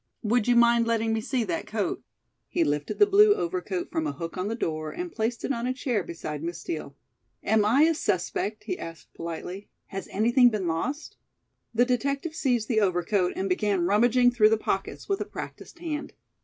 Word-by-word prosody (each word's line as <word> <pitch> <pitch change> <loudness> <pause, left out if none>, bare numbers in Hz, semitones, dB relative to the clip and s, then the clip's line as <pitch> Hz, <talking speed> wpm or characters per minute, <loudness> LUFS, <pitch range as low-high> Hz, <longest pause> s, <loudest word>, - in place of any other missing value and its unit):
"Would 230 +1 +2
you 245 - +4
mind 235 0 +5
letting 225 -1 +1
me 220 - 0
see 250 +1 -1
that 330 +8 -3
coat?" - - -2 0.5
He 345 - +1
lifted 145 - -1
the 415 - +7
blue 410 +1 +6
overcoat 365 -1 -3
from 320 -2 -1
a - - -1
hook 165 -1 -6
on 185 +1 -2
the 225 - -2
door 155 -7 -3
and 350 - -5
placed 230 -1 -2
it - - -1
on 240 -2 -1
a 255 - -1
chair 245 -6 -1
beside 155 -3 -6
Miss 170 +2 -4
Steel. 155 -3 -5 0.5
"Am 215 0 +3
I 240 +8 +4
a 330 +1 +4
suspect?" 210 - -2
he 370 - -4
asked 165 0 -9
politely. 170 +4 -6 0.2
"Has 195 0 -6
anything 240 +4 +4
been 210 -6 -2
lost?" 255 - -3 0.5
The 235 +2 +3
detective 275 +5 -1
seized 245 -8 0
the 220 -3 +2
overcoat 180 0 +1
and 190 - -1
began 190 -1 +1
rummaging 240 +5 +4
through 215 -3 +5
the 220 - +3
pockets - - -3
with 395 -1 -1
a - - -1
practised - - -8
hand. 315 -3 -5
230 Hz, 195 wpm, -27 LUFS, 195-275 Hz, 0.5 s, the